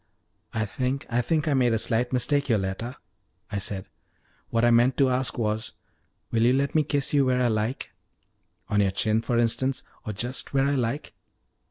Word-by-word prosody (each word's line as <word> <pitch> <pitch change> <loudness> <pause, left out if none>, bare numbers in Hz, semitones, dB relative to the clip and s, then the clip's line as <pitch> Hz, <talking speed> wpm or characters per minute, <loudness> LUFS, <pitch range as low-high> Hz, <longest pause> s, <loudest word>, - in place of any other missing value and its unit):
"I 110 0 -1
think 130 +6 -2
I 120 +1 +2
think 155 +5 0
I 150 - +2
made 125 -3 +3
a - - +3
slight 120 +2 0
mistake, 140 +3 +1
Yoletta," 110 +3 -1 0.5
I 100 - -1
said. 95 0 -4 0.6
"What 115 +1 +2
I 120 - +5
meant 120 +2 +4
to 135 -2 +4
ask 125 +1 0
was, 110 -1 -2 0.6
will 115 - +1
you 120 +2 +5
let 140 +1 +1
me 155 - +4
kiss 145 -1 -1
you 140 -1 +5
where 130 -1 +2
I 125 -1 +3
like 110 +4 -2 0.8
on 105 0 +2
your 100 - +3
chin, 110 +2 +1
for 120 0 -1
instance, 125 +3 +1 0.2
or 110 - -4
just 120 +7 -3
where 135 0 +4
I 140 - +1
like?" 130 +1 -2
120 Hz, 190 wpm, -26 LUFS, 110-135 Hz, 0.8 s, I